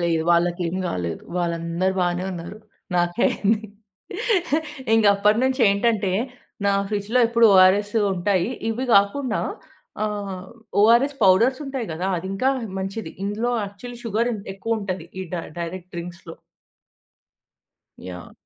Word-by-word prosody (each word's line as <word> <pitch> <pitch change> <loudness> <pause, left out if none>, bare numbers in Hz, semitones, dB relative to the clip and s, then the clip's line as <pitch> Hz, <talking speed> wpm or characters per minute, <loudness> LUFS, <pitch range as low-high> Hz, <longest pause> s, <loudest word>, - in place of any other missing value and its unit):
లేదు. 165 -2 +1
వాళ్ళకేం 175 +1 +1
గాలేదు. 85 - -3 0.2
వాళ్ళందరు 170 +2 -1
బానే 180 +1 0
ఉన్నారు. 175 +4 -7 0.4
నాకే 175 +5 +1
అయ్యింది. 215 +1 +1 1.3
ఇంగప్పటినుంచి 215 +4 +3
ఏంటంటే, 200 -1 +1 0.5
నా 200 - +4 0.2
ఫ్రిడ్జ్‌లో 210 +3 0
ఎప్పుడు 235 0 +5
ఒ‌ఆర్‌ఎస్సు 205 +4 +5
ఉంటాయి. 185 +2 +1 0.2
ఇవ్వి 255 +4 -2
గాకుండా 215 +4 +2 0.6
ఆహ్, 200 -3 -3 0.4
ఒ‌ఆర్‌ఎస్ 235 +7 +5
పౌడర్సుంటాయి 255 +6 +3
గదా! 175 +4 -3
అదింకా 195 +9 0 0.3
మంచిది. 195 -2 -4
ఇందులో 215 +4 -1
యాక్చువల్లీ 235 +5 -9
షుగరిన్ 230 0 0
ఎక్కువుంటది, 195 -4 -3
ఈ - - -2
డై 170 - -3 0.2
డైరెక్ట్ 175 +1 -6
డ్రింక్స్‌లో. 170 0 -7 1.7
యాహ్! 90 -2 -9
200 Hz, 105 wpm, -23 LUFS, 175-225 Hz, 1.7 s, ఎప్పుడు